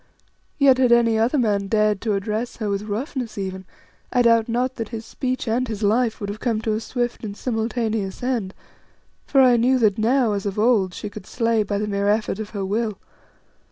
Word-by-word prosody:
Yet 270 -3 +5
had 250 -2 +4
any 230 -2 +4
other 240 +7 +2
man 205 -5 +1
dared 210 -1 +2
to 220 -2 0
address 215 +4 -3
her 215 -3 -3
with 200 +1 -2
roughness 245 +1 -4
even, 190 -1 -5 0.5
I 250 -1 +3
doubt 230 -1 +4
not 250 +3 -1
that 225 -3 -4
his 225 -1 -6
speech 255 -2 -3
and 245 +3 0
his 220 -2 -5
life 225 +2 +2
would 205 - -4
have 205 +1 -6
come 230 -3 0
to 220 -1 -1
a 215 - -1
swift 240 +1 -3
and 205 -1 -6
simultaneous 225 -3 -2
end, 235 -7 -2 0.7
for 275 - +4
I 250 -2 +6
knew 255 +3 +3
that 215 -3 +2
now, 235 0 +2
as 200 0 -2
of 200 - -4
old, 210 -5 +2
she 210 - -6
could 205 -2 -10
slay 230 -2 +1
by 205 -1 -2
the 210 - -1
mere 200 -1 -1
effort 215 -1 0
of 215 -1 -5
her 200 -3 -4
will. 215 +1 -1
220 Hz, 210 wpm, -22 LUFS, 205-240 Hz, 0.7 s, I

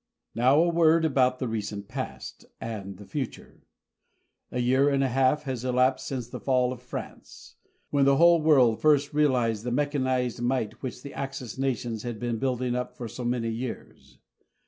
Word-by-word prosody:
Now 130 +5 +4
a 170 - +4
word 165 -1 +4
about 130 -4 +2
the 130 - -3
recent 105 -2 -4
past - - -7
and 100 -4 -6
the 100 - -12
future. 135 -1 -7 0.8
A 125 - -2
year 130 +3 +3
and 135 -1 +2
a - - +2
half 135 +4 +2
has 130 -4 -4
elapsed 130 +1 +1
since 125 -4 -4
the - - -7
fall 130 -2 +1
of 125 - -11
France, 125 - -9 0.4
when 140 -1 +3
the 140 0 +4
whole 170 0 +6
world 130 -8 +4
first 150 -1 +3
realized 125 -7 +1
the 125 - -2
mechanized 130 -3 0
might 120 -3 -1
which 125 -2 -6
the 140 - -8
Axis 135 -3 -6
nations 120 -4 -2
had 120 -2 -5
been 120 -2 -2
building 125 -1 -1
up 125 0 -4
for 120 - -5
so 125 - -7
many 120 -1 -1
years. 120 +2 -7
130 Hz, 175 wpm, -27 LUFS, 120-140 Hz, 0.8 s, whole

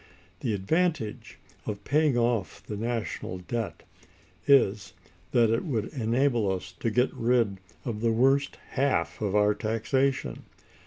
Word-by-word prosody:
The 115 -5 -1
advantage 145 - -1 0.3
of 105 -1 -4
paying 150 0 +2
off 120 -4 0
the 105 - -5
national 115 -4 -3
debt 110 +5 -4 0.6
is, 105 -8 +4 0.4
that 115 -2 +4
it 115 - +1
would 115 - -2
enable 120 -3 +1
us 95 0 -4
to 115 - 0
get 125 +4 +2
rid 115 -5 +1 0.3
of 110 -3 -3
the 115 0 +2
worst 135 +4 +2
half 130 -12 0
of 105 -2 0
our 105 0 +4
taxation. 130 +6 -1
115 Hz, 135 wpm, -28 LUFS, 105-130 Hz, 0.6 s, is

